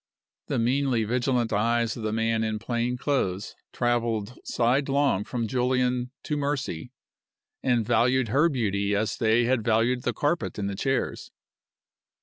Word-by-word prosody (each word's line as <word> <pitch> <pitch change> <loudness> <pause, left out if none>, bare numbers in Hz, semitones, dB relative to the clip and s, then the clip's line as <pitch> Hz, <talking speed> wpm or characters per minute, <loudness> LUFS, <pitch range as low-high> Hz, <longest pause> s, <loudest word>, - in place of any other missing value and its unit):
The - - -1
meanly 125 0 +1
vigilant 120 0 0
eyes 115 +2 +1
of 120 - -7
the 110 0 -2
man 115 0 +1
in 110 -1 -1
plain 120 +2 -2
clothes 105 -9 -1 0.2
traveled 120 -2 0
sidelong 135 -2 +1
from 120 -3 -2
Julian 125 +1 0
to 150 - -2
Mercy, 140 - -3 0.7
and 120 -4 +1
valued 120 +1 +2
her 145 +8 +4
beauty 100 -7 0
as 110 +2 0
they 115 +1 +3
had 120 -1 +1
valued 115 +2 +2
the - - 0
carpet 160 +4 -1
and 100 -1 -2
the 100 - -3
chairs. 135 +6 -2
120 Hz, 140 wpm, -26 LUFS, 110-130 Hz, 0.7 s, her